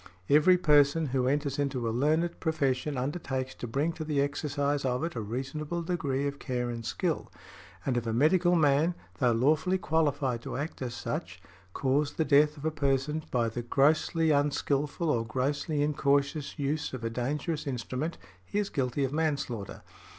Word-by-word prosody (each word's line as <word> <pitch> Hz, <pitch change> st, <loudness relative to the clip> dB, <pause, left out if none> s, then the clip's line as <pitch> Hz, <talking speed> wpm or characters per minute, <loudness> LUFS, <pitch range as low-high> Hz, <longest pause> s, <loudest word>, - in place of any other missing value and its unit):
"Every 155 Hz, +5 st, +6 dB
person 150 Hz, -1 st, +4 dB
who 130 Hz, -2 st, +2 dB
enters 140 Hz, +1 st, 0 dB
into 135 Hz, -4 st, -1 dB
a -, -, 0 dB
learned 155 Hz, +7 st, +1 dB
profession 145 Hz, -3 st, 0 dB
undertakes 130 Hz, -1 st, -3 dB
to 120 Hz, -, -7 dB
bring 145 Hz, +8 st, 0 dB
to 160 Hz, -, -5 dB
the 150 Hz, -2 st, -1 dB
exercise 145 Hz, 0 st, 0 dB
of 125 Hz, +2 st, 0 dB
it 165 Hz, -, -2 dB
a 115 Hz, -, -3 dB
reasonable 140 Hz, +9 st, -4 dB
degree 145 Hz, -6 st, -1 dB
of 140 Hz, 0 st, -3 dB
care 125 Hz, -2 st, -2 dB
and 115 Hz, -1 st, -5 dB
skill". -, -, -2 dB, 0.5 s
And 130 Hz, -, 0 dB
if 120 Hz, -1 st, -1 dB
a -, -, 0 dB
medical 175 Hz, +9 st, +3 dB
man, 155 Hz, +2 st, +3 dB, 0.2 s
though 125 Hz, -2 st, +4 dB
lawfully 155 Hz, +10 st, +2 dB
qualified 145 Hz, -8 st, 0 dB
to -, -, -5 dB
act 145 Hz, +2 st, -5 dB
as 120 Hz, -2 st, -3 dB
such, -, -, -4 dB, 0.3 s
cause 140 Hz, +2 st, +1 dB
|85| -, -, -24 dB
the 160 Hz, -, +1 dB
death 150 Hz, +1 st, +4 dB
of 145 Hz, -, -8 dB
a 160 Hz, -, +1 dB
person 145 Hz, +1 st, 0 dB
by 120 Hz, -2 st, +1 dB
the 115 Hz, +2 st, -3 dB
grossly 155 Hz, +6 st, +2 dB
unskilful 145 Hz, +2 st, 0 dB
or 120 Hz, -7 st, +2 dB
grossly 140 Hz, +5 st, -1 dB
incautious 140 Hz, 0 st, 0 dB
use 145 Hz, +1 st, -2 dB
of 125 Hz, -3 st, -6 dB
a 115 Hz, -, -2 dB
dangerous 150 Hz, +6 st, -2 dB
instrument, 130 Hz, +5 st, -3 dB, 0.3 s
he 200 Hz, -, -5 dB
is 205 Hz, -1 st, 0 dB
guilty 135 Hz, +1 st, -1 dB
of 135 Hz, +1 st, -1 dB
manslaughter. 140 Hz, -10 st, -2 dB
145 Hz, 175 wpm, -29 LUFS, 130-155 Hz, 0.5 s, Every